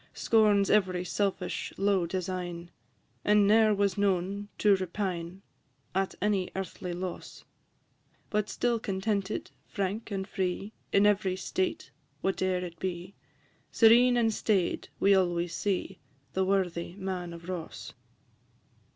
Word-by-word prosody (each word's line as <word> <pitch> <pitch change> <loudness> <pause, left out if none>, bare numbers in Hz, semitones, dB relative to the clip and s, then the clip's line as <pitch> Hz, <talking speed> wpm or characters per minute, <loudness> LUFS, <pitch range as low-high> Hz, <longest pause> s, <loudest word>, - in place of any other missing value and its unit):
Scorns 210 -3 +3
every 185 -3 +2
selfish, 190 -1 -2
low 195 -3 +2
design, 175 -1 -4 0.5
And 210 -1 +4
ne'er 215 +1 +5
was 200 -1 +1
known 200 +1 0
to 205 -2 +5
repine, 185 -1 -4 0.5
At 190 +1 0
any 200 -3 +1
earthly 185 -1 -5
loss: 180 +1 -6 0.9
But 210 0 0
still 240 -1 0
contented, 200 0 -2 0.2
frank, 200 +3 -3
and 195 -2 -3
free, 190 +3 -3 0.2
In 200 +1 +4
every 195 -3 +2
state, 185 0 -2 0.3
whate'er 185 -1 0
it 170 -2 -10
be, 180 0 -4 0.6
Serene 240 +2 +6
and 225 -2 +2
staid 200 -5 0
we 200 +1 +5
always 175 -2 +1
see 195 -1 -2 0.3
The 190 0 +1
worthy 180 -3 -1
Man 185 -3 -4
of 170 0 -10
Ross. 180 -3 -6
190 Hz, 120 wpm, -29 LUFS, 180-205 Hz, 0.9 s, Serene